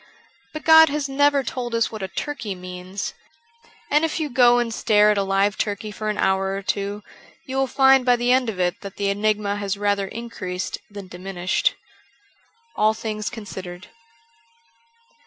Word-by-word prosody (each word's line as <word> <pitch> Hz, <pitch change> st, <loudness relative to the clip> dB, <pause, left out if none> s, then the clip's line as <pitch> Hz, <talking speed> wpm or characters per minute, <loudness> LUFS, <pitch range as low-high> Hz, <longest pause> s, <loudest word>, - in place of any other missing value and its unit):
But 310 Hz, -, -7 dB
God 320 Hz, -1 st, +8 dB
has 290 Hz, 0 st, -2 dB
never 285 Hz, 0 st, +2 dB
told 240 Hz, -1 st, -4 dB
us 230 Hz, -, +1 dB
what 220 Hz, -2 st, -7 dB
a 190 Hz, -, -2 dB
turkey 235 Hz, -2 st, -5 dB
means. 180 Hz, +2 st, -6 dB, 0.8 s
And 300 Hz, +2 st, +4 dB
if 325 Hz, 0 st, -1 dB
you 305 Hz, -2 st, -2 dB
go 245 Hz, -1 st, +5 dB
and 235 Hz, -2 st, 0 dB
stare 210 Hz, -2 st, +4 dB
at 210 Hz, -, 0 dB
a -, -, +2 dB
live 195 Hz, +1 st, +1 dB
turkey 210 Hz, 0 st, -2 dB
for 215 Hz, +1 st, -4 dB
an 210 Hz, -, -2 dB
hour 190 Hz, 0 st, +1 dB
or 195 Hz, -, -5 dB
two, 200 Hz, +1 st, -3 dB, 0.4 s
you 260 Hz, -, -6 dB
will 270 Hz, 0 st, +2 dB
find 265 Hz, 0 st, +5 dB
by 245 Hz, -1 st, +4 dB
the 240 Hz, +1 st, +1 dB
end 255 Hz, -2 st, +3 dB
of 195 Hz, -4 st, -5 dB
it 180 Hz, +1 st, 0 dB
that 200 Hz, -2 st, -8 dB
the 200 Hz, -1 st, -1 dB
enigma 205 Hz, 0 st, 0 dB
has 200 Hz, -1 st, -2 dB
rather 200 Hz, -1 st, 0 dB
increased 190 Hz, -5 st, -5 dB
than 200 Hz, -2 st, -9 dB
diminished. 180 Hz, 0 st, -1 dB, 1.0 s
^ -, -, -3 dB
^111 215 Hz, +1 st, +3 dB
Things 215 Hz, -2 st, -3 dB
Considered.' 190 Hz, -5 st, -8 dB
210 Hz, 175 wpm, -22 LUFS, 195-245 Hz, 1.0 s, God